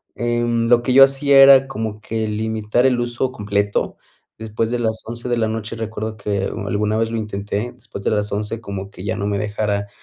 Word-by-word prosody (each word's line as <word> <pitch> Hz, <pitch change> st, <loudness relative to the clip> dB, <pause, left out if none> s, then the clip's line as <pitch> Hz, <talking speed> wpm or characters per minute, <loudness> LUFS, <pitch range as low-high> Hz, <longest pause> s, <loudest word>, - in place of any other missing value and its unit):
em, 120 Hz, -1 st, 0 dB
lo 120 Hz, -1 st, +5 dB
que 125 Hz, +1 st, 0 dB
yo 135 Hz, +1 st, +9 dB
hacía 135 Hz, 0 st, +5 dB
era 135 Hz, -1 st, +7 dB
como 110 Hz, -5 st, -5 dB
que 110 Hz, 0 st, -3 dB
limitar 110 Hz, +2 st, 0 dB
el 125 Hz, -2 st, +1 dB
uso 120 Hz, +2 st, -2 dB
completo 100 Hz, -2 st, -1 dB, 0.4 s
después 110 Hz, +1 st, -2 dB
de 120 Hz, -, -1 dB
las 110 Hz, -1 st, -1 dB
11 120 Hz, +2 st, -5 dB
de 120 Hz, -, +1 dB
la 110 Hz, -1 st, +1 dB
noche. 110 Hz, 0 st, -4 dB
Recuerdo 110 Hz, -1 st, -5 dB
que 100 Hz, -1 st, -2 dB
u 100 Hz, -, -5 dB
alguna 105 Hz, +2 st, 0 dB
vez 115 Hz, 0 st, 0 dB
lo 115 Hz, -, -2 dB
intenté 105 Hz, +2 st, -4 dB
después 120 Hz, -5 st, -10 dB
de -, -, +1 dB
las 105 Hz, -1 st, -1 dB
11, 105 Hz, +2 st, -3 dB
como 100 Hz, -2 st, -6 dB
que 95 Hz, -, -11 dB
ya 95 Hz, -, -2 dB
no 100 Hz, -, -2 dB
me 100 Hz, -1 st, -1 dB
dejara 105 Hz, 0 st, -2 dB
110 Hz, 215 wpm, -20 LUFS, 105-120 Hz, 0.4 s, yo